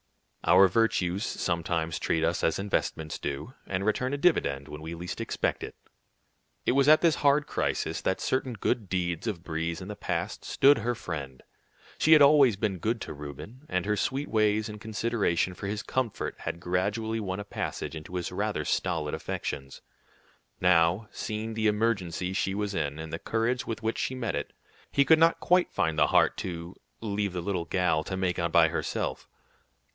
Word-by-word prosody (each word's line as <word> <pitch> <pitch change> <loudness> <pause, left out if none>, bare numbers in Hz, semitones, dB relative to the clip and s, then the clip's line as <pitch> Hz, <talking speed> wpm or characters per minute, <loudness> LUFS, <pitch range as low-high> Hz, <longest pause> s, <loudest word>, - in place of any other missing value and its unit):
Our 95 +1 +7
virtues 95 -2 +1
sometimes 85 -5 -1
treat 80 - 0
us 85 +1 0
as 80 - +2
investments 90 -5 -2
do, 75 - -4
and 95 +1 -2
return 125 +4 0
a - - -3
dividend 70 - +1
when 75 0 -8
we 80 +2 -6
least 85 +1 -5
expect - - -1
it. - - -7 0.9
It - - +3
was 135 +2 +3
at 155 +1 +7
this 165 -3 +3
hard 145 +1 +3
crisis - - -1
that 95 - 0
certain 130 -1 -1
good 105 -1 -1
deeds 90 +1 -1
of 90 -6 -3
Brie's 80 0 -3
in 90 - -7
the 105 - -6
past - - -3
stood 140 -2 +4
her 120 +2 -1
friend. 70 -10 -6 0.6
She 160 - +6
had 150 -2 +8
always 140 -5 +6
been 95 -2 -2
good 115 +6 -1
to - - -5
Reuben, 75 - -9
and 90 0 0
her 105 +1 +1
sweet 135 +7 -1
ways 110 -1 +2
and 105 -1 -8
consideration 105 -5 0
for 100 - -6
his 105 +3 -3
comfort 130 -5 -2
had 85 - -4
gradually 105 +6 -1
won 95 -2 -3
a - - -4
passage 100 - -4
into 80 +3 -8
his 90 -2 -3
rather - - -2
stolid 80 -5 -1
affections. 70 -1 -5 0.8
Now, 90 +3 +3
seeing 110 +1 -4
the 110 0 +1
emergency 100 -5 0
she 95 0 0
was 105 0 -2
in, 75 -5 -2
and 80 0 -7
the 80 - -3
courage 115 +2 -1
with 115 0 -4
which 110 +1 -1
she 130 - -1
met 115 -5 -2
it, 70 - -4 0.4
he 140 - +3
could 160 +1 +6
not 165 +1 +4
quite 180 0 +3
find 80 -1 0
the - - +5
heart - - +4
to 85 -1 -5 0.3
"leave 100 -3 -1
the 90 - -3
little 90 -2 -2
gal 85 -4 +1
to 95 - -3
make 95 -1 0
out 85 -1 0
by 80 -1 +6
herself." - - -3
95 Hz, 185 wpm, -28 LUFS, 85-115 Hz, 0.9 s, had